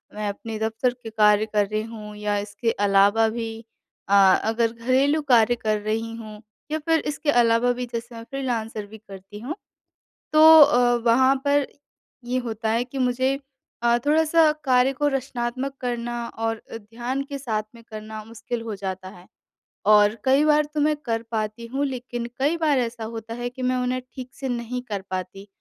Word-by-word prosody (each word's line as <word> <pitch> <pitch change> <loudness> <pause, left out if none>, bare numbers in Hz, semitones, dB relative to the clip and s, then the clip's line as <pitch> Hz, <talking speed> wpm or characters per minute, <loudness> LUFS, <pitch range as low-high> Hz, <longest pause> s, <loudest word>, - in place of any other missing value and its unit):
मैं 210 0 -3
अपने 220 +2 -6
दफ़्तर 225 +3 0
के 225 - -6
कार्य 210 -1 +4
कर 210 -2 0
रही 215 +1 -2
हूँ 215 -2 -9
या 210 0 -1
इसके 205 +3 -2 0.2
अलावा 200 +3 +4
भी 230 0 -4 0.6
अ, - - +1 0.3
अगर 225 +1 +1
घरेलू 260 +6 +1
कार्य 235 0 +5
कर 215 -2 -1
रही 225 +2 -2
हूँ 215 -2 -10 0.3
या 310 - 0
फिर 325 -1 +3
इसके 295 0 -2
अलावा 240 -1 +3
भी 250 0 -4
जैसे 235 +1 -5
मैं 230 - -8
फ़्रीलांसर 230 -4 -4
भी 215 +2 -12
करती 200 -1 -12
हूँ, 265 +9 -5 0.8
तो 315 +1 +9
अ, 245 -3 +5
वहाँ 260 +3 +5
पर 285 -1 +2 0.6
ये 250 +1 -1
होता 225 -2 -3
है 230 +2 +1
कि 265 +2 -7
मुझे 260 +2 +1 0.5
अ, 235 0 +4
थोड़ा-सा 315 +1 +4
कार्य 255 0 +3
को 290 +2 -1
रचनात्मक 265 -1 -3
करना 240 -1 -3
और 225 0 -3 0.2
अ, - - -4
ध्यान 240 +5 -4
के 280 -1 -5
साथ 220 -5 -2
में 230 - -14
करना 215 -1 -8
मुश्किल 230 +1 -6
हो 225 -2 -5
जाता 190 -1 -5
है 180 -1 -14 0.7
और 210 0 +5
कई 270 +3 +4
बार 300 0 +4
तो 300 - 0
मैं 305 +1 +3
कर 230 -6 -3
पाती 220 +1 -3
हूँ, 270 +4 -2
लेकिन 245 -2 -5
कई 295 +5 +1
बार 305 -4 +2
ऐसा 235 -2 -3
होता 225 0 -7
है 240 0 -3
कि 255 +1 -9
मैं 255 0 +1
उन्हें 250 0 -1
ठीक 255 -1 -7
से 270 -1 -5
नहीं 245 +1 -3
कर 200 -2 -3
पाती 185 +1 -5
235 Hz, 185 wpm, -24 LUFS, 220-260 Hz, 0.8 s, तो